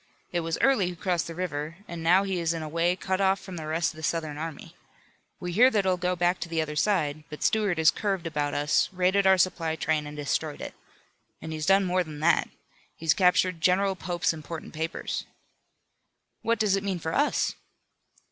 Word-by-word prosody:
It 175 - 0
was 165 -1 -2
Early 225 -10 +3
who 180 - -7
crossed 175 -1 -1
the 165 - -7
river, 160 -2 -4
and 170 -1 -6
now 180 +4 +4
he 190 -2 -2
is 165 0 0
in 160 - -4
a - - -5
way 170 +3 +1
cut 190 +1 -2
off 195 0 +3
from 190 -2 -9
the 155 -2 -6
rest 165 +2 0
of - - -17
the - - -9
Southern 160 -1 -2
army. 160 +1 -7 0.6
We 180 - -4
hear 240 +9 +6
that 210 -6 +1
he'll 185 -1 +3
go 180 0 -1
back 175 +1 +1
to 170 - -5
the 165 -1 -1
other 155 -1 -2
side. 155 -5 +1
But 150 - -7
Stuart 210 -5 +2
has 160 0 +5
curved 195 -5 -2
about 150 -3 -2
us, 145 -1 +2
raided 190 +2 +2
our 190 0 +6
supply 165 -2 +1
train 155 -2 -1
and 150 0 -8
destroyed 150 +1 -2
it. - - -6 0.7
And 160 - -6
he's 155 +1 -4
done 195 0 +5
more 185 0 +1
than 155 -3 -9
that. 170 +2 +3 0.5
He's 160 -1 +2
captured 180 -2 +2
General 190 +2 +3
Pope's 175 -2 -1
important 160 +1 -8
papers." 160 +1 -4 1.1
"What 230 0 +1
does 210 -3 +2
it 195 - -2
mean 195 -2 -1
for 160 -1 -4
us?" 290 +1 +1
170 Hz, 210 wpm, -27 LUFS, 160-190 Hz, 1.1 s, hear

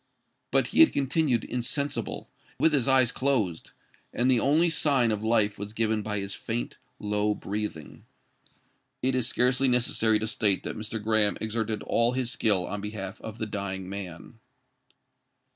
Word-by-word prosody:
But - - +2
he - - -1
had 325 - +7
continued 135 -3 +1
insensible—with 140 +4 -2
his 135 -3 +1
eyes 130 -3 +4
closed; 115 -12 0 0.4
and 125 +2 +2
the 125 - +4
only 155 +7 +3
sign 140 -7 +2
of 105 0 -2
life 110 -3 +2
was 105 +1 -6
given 110 -1 0
by 105 0 -3
his 100 0 -4
faint, - - -4 0.2
low 105 0 0
breathing. 100 -8 -5 1.0
It 130 +1 +2
is 125 -2 +1
scarcely 125 +2 +2
necessary 120 -3 +2
to 110 - -3
state 105 -4 +1
that - - -4
Mr. 110 +1 -5
Graham 110 -1 +1
exerted 110 0 -2
all 115 +1 +2
his 125 -2 -1
skill 105 -7 +2
on 105 - -4
behalf 105 -1 -6
of 110 0 -7
the 110 - -2
dying 100 -3 -4
man. 100 +2 -8
110 Hz, 155 wpm, -27 LUFS, 105-125 Hz, 1.0 s, had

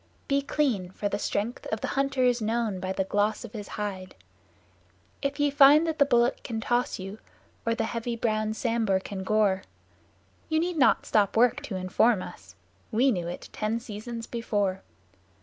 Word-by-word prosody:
Be 280 -1 +2
clean, 260 -11 0
for 205 +2 -3
the 205 - -2
strength 220 +5 -2
of 220 - -3
the - - -2
hunter 275 -1 0
is 245 -1 +3
known 220 -3 -1
by 185 +1 -3
the 190 0 0
gloss 205 +4 0
of 220 - -12
his 205 -3 -6
hide. 190 -3 -5 1.1
If 280 +1 -2
ye 290 -1 +3
find 290 +3 +7
that 320 -1 -2
the 285 - +5
Bullock 240 -1 +2
can 225 -3 -4
toss 240 +2 0
you, 195 +3 -7 0.5
or 230 - +2
the - - -1
heavy 230 +1 -3
browed 215 -2 -1
Sambhur 225 -5 +1
can 190 0 -6
gore; 200 -2 +2 0.9
Ye 315 - +1
need 345 +1 0
not 270 - +4
stop 210 -1 +2
work 245 +4 +4
to 210 - -5
inform 185 +3 +2
us: - - -11 0.4
we 250 +4 +3
knew 175 -6 -2
it 175 - -7
ten 215 +2 -2
seasons 230 +1 -7
before. 205 -5 -1
225 Hz, 180 wpm, -27 LUFS, 205-250 Hz, 1.1 s, find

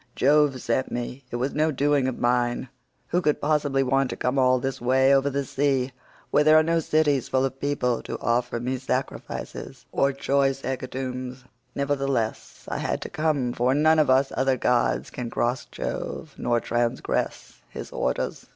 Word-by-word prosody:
Jove 145 -1 +3
sent 120 +2 -1
me; 125 +2 -4
it - - -5
was 130 +3 -1
no 155 +1 +2
doing 145 -2 +2
of 130 - -3
mine; 120 0 0 0.4
who 180 - +1
could 150 -4 +1
possibly 145 -2 +1
want 135 0 +1
to - - -4
come 125 +2 0
all 130 0 +4
this 130 0 -3
way 130 +2 +4
over 135 +1 +3
the 140 0 -2
sea 135 -1 0 0.4
where 150 - +4
there 155 +1 +6
are 155 - +6
no 165 +1 +2
cities 150 -4 +1
full 130 0 +2
of 135 0 -4
people 135 -4 0
to - - -5
offer 120 0 0
me 130 +2 -2
sacrifices 130 +1 -4
or 140 - +2
choice 135 0 +1
hecatombs? 130 0 -4 0.3
Nevertheless 135 -5 -2
I - - -3
had - - -1
to - - -5
come, 145 -6 0
for 125 +2 +1
none 155 +2 +4
of 150 - +3
us 135 +1 +4
other 130 0 +2
gods 125 0 +1
can 120 -2 -5
cross 120 +2 -1
Jove, - - -5
nor 120 -1 0
transgress 120 +1 -2
his - - -8
orders. - - -2
135 Hz, 175 wpm, -25 LUFS, 125-140 Hz, 0.4 s, there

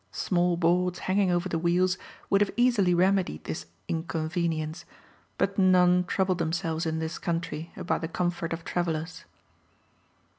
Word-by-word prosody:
Small 175 -1 +1
boards 180 +1 +2
hanging 190 0 +1
over 175 +1 +1
the 165 -3 -1
wheels 180 +2 +2 0.4
would 195 - +4
have 205 - +3
easily 230 -8 +3
remedied 185 - +1
this - - -5 0.2
inconvenience; 160 -1 -2 0.5
but 200 +1 0
none 180 -1 +5
trouble 190 +1 +1
themselves 165 -1 -2
in 160 0 -1
this 160 0 -4
country 165 -1 -3
about - - -1
the 165 - -2
comfort 175 0 -2
of 165 0 -4
travellers. 165 -1 -3
175 Hz, 140 wpm, -27 LUFS, 165-185 Hz, 0.5 s, none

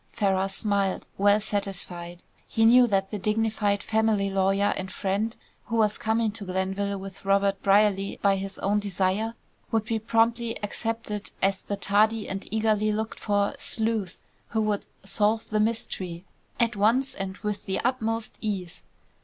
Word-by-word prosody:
Ferrars 195 -2 +1
smiled, 200 -3 0
well 205 +1 +5
satisfied. 180 -4 -3 0.2
He 225 - +2
knew 245 +2 +7
that 195 -3 0
the 210 - -3
dignified 210 -1 +1
family 220 -3 +1
lawyer 195 +1 +2
and 190 0 -5
friend, 200 +5 -1 0.3
who 230 - -3
was 215 -2 +2
coming 225 -1 +1
to 215 0 -8
Glenville 195 +2 -1
with 195 -1 -9
Robert 195 0 +2
Brierly 200 -1 +3
by 200 -1 +3
his 195 0 -5
own 205 +2 +1
desire, 200 +3 -1 0.3
would 225 -1 +1
be 225 0 -1
promptly 230 +1 +1
accepted 220 0 -3
as 195 -1 +1
the 205 - -4
tardy 210 +3 +2
and 195 +1 -5
eagerly 215 -1 +2
looked 220 +1 -3
for 205 +1 +1
"sleuth" 220 -8 -2 0.2
who 220 - 0
would 210 -1 -1 0.2
"solve 215 +2 +1
the 215 - +2
mystery" 190 -5 -2 0.3
at 235 -1 +2
once 235 +7 +2
and 195 0 -5
with 210 -1 -3
the 190 - 0
utmost 225 -3 -1
ease. 195 -6 -3
205 Hz, 155 wpm, -26 LUFS, 195-220 Hz, 0.3 s, knew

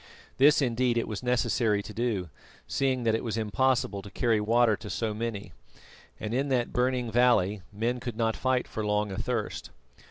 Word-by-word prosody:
This 145 +2 +6
indeed 120 -1 +1
it 115 - 0
was 105 -3 -4
necessary 120 -4 +1
to 105 - -9
do, 105 -6 -1 0.4
seeing 130 -2 0
that 115 -1 +2
it 110 - -1
was 115 -2 -2
impossible 110 -1 +1
to 100 - -10
carry 115 0 +1
water 115 +1 +3
to 105 - -9
so 110 0 -2
many, 105 -4 -5 0.7
and 110 +1 -4
in 135 +3 0
that 125 -3 0
burning 125 -1 0
valley 110 -5 +3
men 115 +4 -1
could 120 -3 -6
not 115 -1 +1
fight 130 -1 0
for 110 - -4
long 105 0 0
athirst. 115 +2 -3
115 Hz, 180 wpm, -28 LUFS, 105-125 Hz, 0.7 s, This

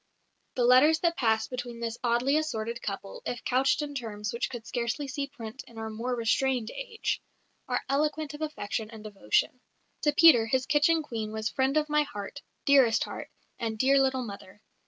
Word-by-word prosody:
The 250 - +1
letters 260 +6 +6
that 335 -1 +2
passed 220 -4 +1
between 245 -2 -5
this 230 0 -4
oddly 240 +4 +2
assorted 235 -7 -2
couple, 195 -1 -6
if 245 - -4
couched 265 +4 +2
in 290 -1 -5
terms 210 -5 -4
which 235 - -2
could 240 -3 -7
scarcely 240 +5 -2
see 280 +1 -3
print 240 -2 -9
in 230 - -15
our 220 0 -5
more 240 +3 -2
restrained 240 +1 +1
age, - - -3 0.5
are - - -1
eloquent 300 +2 0
of 295 - -9
affection 220 -8 -3
and 220 -2 -11
devotion. 210 - 0 0.4
To 295 - +3
Peter 290 -9 +7
his 260 +3 +1
kitchen 310 +2 +3
Queen 225 -6 -4
was 220 0 -2
"friend 265 +2 +1
of 305 0 +2
my 300 0 +3
Heart," 285 -1 -6 0.2
"dearest 265 -5 +5
Heart," - - -7 0.3
and 225 -2 -2
"dear 270 +4 +4
little 265 -1 +1
Mother." 200 -1 -10
250 Hz, 180 wpm, -28 LUFS, 225-285 Hz, 0.5 s, Peter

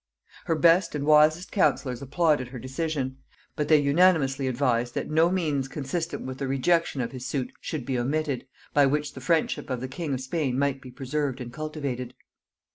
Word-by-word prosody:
Her 165 - +1
best 170 +1 +4
and 145 -1 -2
wisest 155 +4 +4
counsellors 130 - +1
applauded 145 -1 +1
her 125 +1 -8
decision, 130 +1 -3 0.4
but 150 - -1
they 155 -1 +6
unanimously 140 -3 +3
advised 120 -2 0
that - - -3
no 160 +2 +4
means 155 -7 0
consistent 165 +5 -4
with 130 0 -6
the 135 - -2
rejection 140 +2 +1
of 120 - -3
his 130 -1 -6
suit 130 -1 -3
should 150 -6 -4
be 130 -2 -1
omitted, 140 +1 -1 0.3
by 145 -1 +5
which 150 +1 -1
the 130 - -9
friendship 160 +2 0
of 130 -2 -2
the 130 - -4
king 150 +3 -5
of 130 - -5
Spain 130 -1 -1
might 140 -1 0
be 130 - -10
preserved 135 +1 -3
and 120 -1 -7
cultivated. 140 -5 -4
140 Hz, 185 wpm, -26 LUFS, 130-155 Hz, 0.4 s, they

